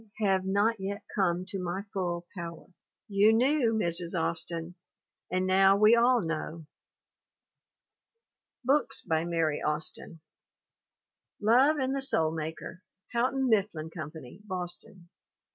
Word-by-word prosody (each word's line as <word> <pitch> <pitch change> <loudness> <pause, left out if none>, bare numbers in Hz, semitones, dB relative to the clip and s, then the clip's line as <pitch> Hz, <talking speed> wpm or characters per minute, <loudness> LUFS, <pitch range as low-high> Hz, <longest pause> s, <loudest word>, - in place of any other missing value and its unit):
have 195 -3 +1
not 205 +4 +1
yet 200 +1 -4
come 180 -2 +1
to 195 0 -5
my 180 +2 -3
full 175 -2 -2
power." 170 -2 -7 0.4
You 205 +1 +4
knew, 250 0 +3
Mrs. 170 -3 0
Austin. 165 +1 -3 0.6
And 185 +1 0
now 195 +1 +5
we 215 +3 +6
all 240 +1 +4
know. 160 0 -4 2.0
BOOKS 270 +1 +1
BY 160 -1 0
MARY 165 -3 0
AUSTIN 155 +1 -3 1.2
Love 255 +8 +4
and 265 -1 -1
the 275 - -2
Soul 165 -13 +1
Maker, 160 +2 -6 0.3
Houghton 260 +3 +1
Mifflin 195 -8 0
Com 155 -4 -5
pany, 155 +1 -12
Boston. 180 -2 -7
185 Hz, 120 wpm, -29 LUFS, 165-220 Hz, 2.0 s, we